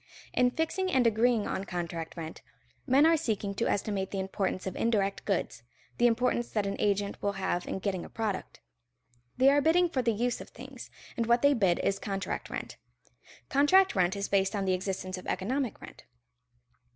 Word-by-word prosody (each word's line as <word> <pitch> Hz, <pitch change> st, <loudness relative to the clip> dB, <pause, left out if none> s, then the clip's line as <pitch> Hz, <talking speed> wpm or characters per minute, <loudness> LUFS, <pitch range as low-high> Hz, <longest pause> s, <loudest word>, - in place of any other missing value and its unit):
In 250 Hz, 0 st, +4 dB
fixing 340 Hz, +7 st, -1 dB
and 260 Hz, -5 st, +3 dB
agreeing 230 Hz, 0 st, +3 dB
on 190 Hz, -, -2 dB
contract 170 Hz, -2 st, -5 dB
rent, 160 Hz, -1 st, -7 dB, 0.5 s
men 275 Hz, +3 st, +5 dB
are 330 Hz, +1 st, +6 dB
seeking 220 Hz, -10 st, -2 dB
to 230 Hz, -, -1 dB
estimate 195 Hz, -1 st, -1 dB
the 195 Hz, -, -3 dB
importance 190 Hz, 0 st, -2 dB
of 190 Hz, -, -4 dB
indirect 200 Hz, -4 st, 0 dB
goods, -, -, -1 dB, 0.4 s
the 240 Hz, -, +6 dB
importance 240 Hz, 0 st, +1 dB
that 210 Hz, -2 st, +1 dB
an 195 Hz, -, -2 dB
agent 200 Hz, 0 st, 0 dB
will 200 Hz, 0 st, 0 dB
have 190 Hz, -2 st, -2 dB
in -, -, -2 dB
getting 190 Hz, -2 st, -2 dB
a -, -, -10 dB
product. 220 Hz, -4 st, -4 dB, 0.8 s
They 265 Hz, +2 st, +6 dB
are 290 Hz, +1 st, +4 dB
bidding 345 Hz, +3 st, +4 dB
for 270 Hz, -6 st, 0 dB
the 235 Hz, -1 st, +2 dB
use 235 Hz, +3 st, -1 dB
of -, -, -10 dB
things, -, -, -10 dB, 0.3 s
and 230 Hz, -2 st, -1 dB
what 235 Hz, +2 st, +3 dB
they 285 Hz, 0 st, +6 dB
bid 195 Hz, -9 st, +2 dB
is 195 Hz, 0 st, +1 dB
contract 195 Hz, -2 st, -4 dB
rent. -, -, -6 dB, 0.7 s
Contract 375 Hz, +8 st, +4 dB
rent 185 Hz, 0 st, +2 dB
is 200 Hz, 0 st, -2 dB
based 195 Hz, +1 st, +1 dB
on 200 Hz, -1 st, -1 dB
the 190 Hz, -, +2 dB
existence 185 Hz, 0 st, -3 dB
of -, -, -11 dB
economic 245 Hz, +6 st, -2 dB
rent. -, -, -12 dB
205 Hz, 190 wpm, -29 LUFS, 190-250 Hz, 0.8 s, are